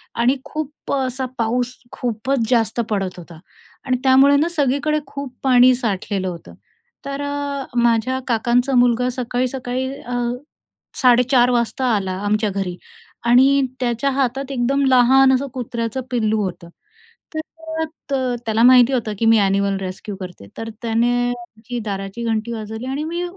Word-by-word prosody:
आणि 245 +3 +3
खूप 305 -1 -6
असा 260 -1 -1
पाऊस 245 +2 0 0.2
खूपच 240 +1 -2
जास्त 230 -2 +1
पडत 195 -4 -2
होता. 170 -2 -11 0.5
आणि 255 -2 +1
त्यामुळे 270 +2 +6
ना, 305 +4 +2
सगळीकडे 295 -1 +1
खूप 280 -2 -7
पाणी 255 -1 +6
साठलेलं 200 -5 -2
होतं. 175 -2 -7 0.5
तर 280 0 -4
अ, 285 -1 -3 0.2
माझ्या 235 +2 +2
काकांचा 245 +3 +1
मुलगा 245 0 +3
सकाळी-सकाळी 250 +1 -2 0.2
अ, 245 +1 -5 0.9
4:30 250 0 +5
वाजता 240 +2 0
आला 190 -2 -2
आमच्या 210 +1 +1
घरी 190 -2 -3 0.5
आणि 265 +4 +5 0.2
त्याच्या 245 +2 0
हातात 270 0 -1
एकदम 270 +3 +1
लहान 265 +1 +5
असं 265 +2 +1
कुत्र्याचं 235 -1 -3
पिल्लू 220 -3 +1
होतं. 180 -2 -5 0.7
तर 320 0 -5 0.3
अ, 255 -2 0
त्याला 225 +1 +2
माहिती 250 +1 +7
होतं 225 -4 -1
की 230 - +1
मी 225 0 +6
ॲनिमल 195 0 +1
रेस्क्यू 190 +2 -6
करते. 180 - -9
तर 225 - -5
त्याने 230 +1 +1 0.2
आमची 240 -1 -7
दाराची 195 +2 -4
घंटी 225 0 -1
वाजवली 220 +1 -6
आणि 270 +3 -3
मी 340 +3 -3
245 Hz, 140 wpm, -20 LUFS, 220-265 Hz, 0.9 s, माहिती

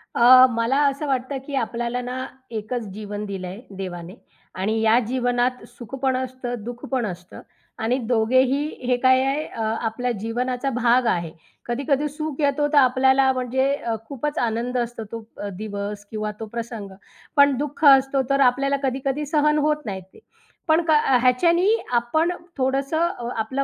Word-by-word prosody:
अ, 255 +2 +8
मला 230 +3 0
असं 280 +2 -2
वाटतं, 265 0 -1
की 280 - -5
आपल्याला 240 0 -2
ना 250 +1 -4 0.3
एकच 225 +2 -3
जीवन 205 0 -6
दिलंय 190 0 -6 0.2
देवाने 180 -1 -6 0.4
आणि 215 +4 0
या 225 +2 +5
जीवनात 245 0 0
सुख 240 +2 -10
पण 265 -1 +1
असतं, 255 -1 -4
दुःख 240 +1 -7
पण 255 -3 0
असतं 180 -2 -8 0.4
आणि 235 +4 +1
दोघेही 255 +5 +2 0.2
हे 250 -1 +2
काय 260 0 +5
आहे 285 +3 -1
अ, 225 - -7 0.2
आपल्या 240 +2 -2
जीवनाचा 245 +4 -2
भाग 250 0 +2
आहे. 170 -6 0 0.3
कधी-कधी 275 +4 0
सुख 305 0 -5
येतो, 290 +1 +2
तर - - +4
आपल्याला 265 0 +4
म्हणजे 260 +2 0
अ, 230 -5 -3
खूपच 285 +3 -4
आनंद 240 +2 -1
असतो 240 -1 -3
तो 230 -1 -6
अ, 205 - -5
दिवस 205 0 -5
किंवा 215 -1 -3
तो 225 - -4
प्रसंग. 225 -2 -6 0.5
पण 285 -1 +5
दुःख 290 +2 -5
असतो, 270 0 +6
तर 275 0 +2
आपल्याला 275 +2 -1
कधी-कधी 270 +2 -1
सहन 300 0 +2
होत 300 -3 -1
नाहीत 190 -3 -5
ते. - - -16 0.5
पण 320 +1 +4
क - - +3
अ, 295 -4 +4
ह्याच्यानी 335 +9 +3 0.2
आपण 250 +8 +1 0.3
थोडंसं 275 +5 +1
अ, 240 0 -4
आपलं 260 +5 -1
250 Hz, 165 wpm, -23 LUFS, 230-275 Hz, 0.5 s, अ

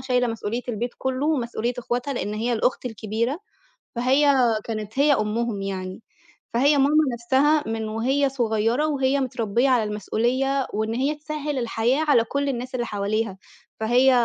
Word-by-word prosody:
شايلة 250 -1 +1
مسؤولية 230 +1 -3
البيت 240 +1 -2
كلّه 265 +2 -1
ومسؤولية 240 -5 -1
إخوتها 245 +3 -2
لإن 210 -4 -3
هي 235 +3 -1
الأخت 240 +3 0
الكبيرة، 225 +5 -2 0.6
فهي 270 +4 +3 0.3
كانت 215 +2 -5
هي 290 +1 +5
أمهم 215 -2 -1
يعني، 190 +1 -5 0.5
فهي 285 +5 +4
ماما 285 +3 +3 0.2
نَفْسها 275 +6 +2
من 225 -1 -2
وهي 265 +6 +1
صغيّرة 235 +2 +1
وهي 275 -2 +1
متربّية 240 0 0
على 245 -4 +3
المسؤولية 245 +6 0
وإن 220 +1 -1
هي 275 +5 0
تسهّل 300 -2 -4
الحياة 240 +5 +1
على 235 -5 +5
كل 280 +4 -2
الناس 255 0 -4
اللي 240 -1 -1
حواليها، 205 0 -2 0.4
فهي 245 +4 +4
245 Hz, 145 wpm, -24 LUFS, 225-275 Hz, 0.6 s, هي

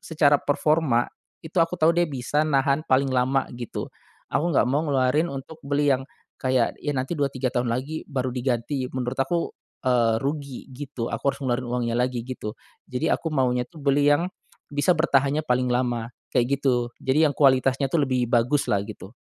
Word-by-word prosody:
secara 150 -3 +3
performa 145 -4 +2 0.4
itu 160 +3 -3
aku 165 +2 -1
tahu 160 +1 +5
dia 175 0 +3
bisa 145 +2 0
nahan 140 0 +2
paling 135 +1 +3
lama 130 +2 +2
gitu. 120 -1 -6 0.4
Aku 170 - +1
nggak 150 - +3
mau 140 +4 +1
ngeluarin 140 +4 +2
untuk 140 +3 -8
beli 145 0 +2
yang 130 - -3 0.4
kayak 130 -2 +1
ya 145 - -1
nanti 130 +6 -2
dua, 140 -1 +2
tiga 130 -1 -2
tahun 120 -1 0
lagi 135 +7 -3
baru 130 -2 -1
diganti 125 +1 -1
menurut 130 0 -3
aku, 170 +5 0 0.3
eee, 120 -3 +3
rugi 140 -2 -4
gitu 130 -3 -5
aku - - -3
harus 140 - -12
ngeluarin 125 -1 -1
uangnya 120 -1 -1
lagi 125 -1 0
gitu. 115 -4 -5 0.4
Jadi 125 +5 0
aku 165 - -1
maunya 125 -4 +1
tuh 165 - -14
beli 145 +1 +3
yang, 145 +4 +3 0.5
bisa 155 +5 +2
bertahannya 145 -1 +2
paling 125 0 +1
lama 120 -2 0 0.3
kayak 125 +3 +2
gitu. 125 -3 +1
Jadi 145 +4 +3
yang - - -2
kualitasnya 135 -1 +3
tuh 165 - +3
lebih 125 -1 +1
bagus 125 +5 +2
lah 100 - +2
gitu. 105 -1 -10
135 Hz, 180 wpm, -25 LUFS, 125-145 Hz, 0.5 s, tahu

